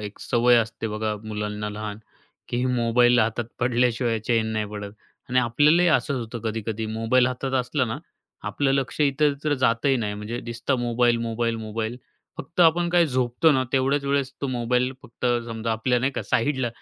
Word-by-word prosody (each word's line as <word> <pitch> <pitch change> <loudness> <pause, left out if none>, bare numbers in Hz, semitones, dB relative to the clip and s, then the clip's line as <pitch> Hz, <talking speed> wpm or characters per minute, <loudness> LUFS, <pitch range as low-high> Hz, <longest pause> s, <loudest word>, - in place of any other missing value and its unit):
एक 105 -1 -7
सवय 120 0 +3
असते 115 0 -1
बघा, 110 0 -2
मुलांना 105 0 -4
लहान, 105 0 -6 0.5
की 120 +1 -1
मोबाईल 120 0 +3
हातात 115 +2 0 0.2
पडल्याशिवाय 120 -1 +1
चैन 115 -2 +2
नाही 110 -1 -1
पडत. 105 -1 -6 0.4
आणि 125 0 +2
आपल्यालाही 150 +9 +4
असंच 140 -2 +2
होतं 120 0 -5
कधी-कधी, 110 0 -3
मोबाईल 115 +3 +3
हातात 130 +1 -3
असला 130 +2 -1
ना, 110 -2 -4 0.5
आपलं 140 -2 0
लक्ष 135 +2 -1
इतरत्र 145 +1 +2
जातंही 130 +1 +2
नाही. 105 -4 -2
म्हणजे 105 +4 -5
दिसतं 120 +3 -2
मोबाईल, 120 0 +2
मोबाईल, 115 0 -1
मोबाईल. 110 +1 -4 0.4
फक्त 165 +6 -4
आपण 170 +1 +4
काय 175 -1 +4
झोपतो 130 +3 +2
ना, 130 -2 +2
तेवढ्याच 135 +2 +1
वेळेस 140 -1 0
तो 140 - -1
मोबाईल 125 +1 0
फक्त 125 -1 -5 0.2
समजा 115 0 -3
आपल्या 120 +3 +1
नाही 135 +3 0
का - - -3
साईडला. 130 0 0
120 Hz, 170 wpm, -24 LUFS, 115-135 Hz, 0.5 s, आपल्यालाही